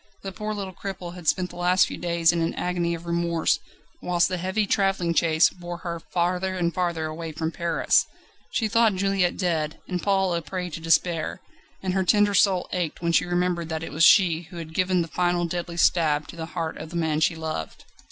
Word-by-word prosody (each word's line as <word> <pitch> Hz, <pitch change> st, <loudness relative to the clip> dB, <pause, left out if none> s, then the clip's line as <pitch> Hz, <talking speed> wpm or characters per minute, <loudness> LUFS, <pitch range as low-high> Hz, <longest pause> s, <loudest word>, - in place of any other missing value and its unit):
The 195 Hz, -, -5 dB
poor 215 Hz, +3 st, -4 dB
little 195 Hz, -2 st, -5 dB
cripple 180 Hz, -2 st, -6 dB
had 175 Hz, -3 st, -10 dB
spent 180 Hz, +3 st, +1 dB
the -, -, -11 dB
last 180 Hz, +1 st, +4 dB
few -, -, -6 dB
days 170 Hz, -2 st, +2 dB
in 170 Hz, -1 st, -1 dB
an 165 Hz, -, -1 dB
agony 175 Hz, -1 st, -1 dB
of 165 Hz, +1 st, -10 dB
remorse, 170 Hz, -1 st, +1 dB, 0.4 s
whilst 175 Hz, -1 st, +2 dB
the 185 Hz, -1 st, -2 dB
heavy 190 Hz, +4 st, 0 dB
travelling 195 Hz, -4 st, +1 dB
chaise 160 Hz, 0 st, +4 dB
bore 175 Hz, -1 st, -7 dB
her 170 Hz, -1 st, -5 dB
farther 180 Hz, +2 st, -1 dB
and 170 Hz, -2 st, 0 dB
farther 170 Hz, -3 st, -1 dB
away 160 Hz, +1 st, -5 dB
from 160 Hz, +1 st, -3 dB
Paris. 170 Hz, 0 st, +2 dB, 0.4 s
She 225 Hz, -, 0 dB
thought 225 Hz, -2 st, +3 dB
Juliette 195 Hz, -2 st, +1 dB
dead, 160 Hz, -4 st, -1 dB
and 180 Hz, -2 st, -3 dB
Paul 195 Hz, -2 st, +1 dB
a 170 Hz, -, -1 dB
prey 180 Hz, +2 st, -5 dB
to 160 Hz, -, -5 dB
despair, 165 Hz, 0 st, +1 dB, 0.4 s
and 185 Hz, -1 st, -1 dB
her 190 Hz, 0 st, +1 dB
tender 205 Hz, +2 st, +3 dB
soul 190 Hz, -3 st, +3 dB
ached 175 Hz, -2 st, -3 dB
when 170 Hz, -, +1 dB
she -, -, +3 dB
remembered 175 Hz, -1 st, -1 dB
that 160 Hz, 0 st, -3 dB
it -, -, -6 dB
was 160 Hz, +2 st, +1 dB
she 170 Hz, -3 st, +5 dB
who 175 Hz, -, -10 dB
had 160 Hz, -1 st, -7 dB
given 185 Hz, 0 st, +2 dB
the -, -, -7 dB
final 175 Hz, +1 st, 0 dB
deadly 170 Hz, 0 st, -4 dB
stab 155 Hz, -4 st, +2 dB
to -, -, -9 dB
the 160 Hz, -1 st, -6 dB
heart 160 Hz, -1 st, -2 dB
of 155 Hz, -, -7 dB
the 170 Hz, -, -9 dB
man 160 Hz, -2 st, 0 dB
she 160 Hz, +1 st, +2 dB
loved. 160 Hz, -, -5 dB
175 Hz, 215 wpm, -25 LUFS, 165-185 Hz, 0.4 s, she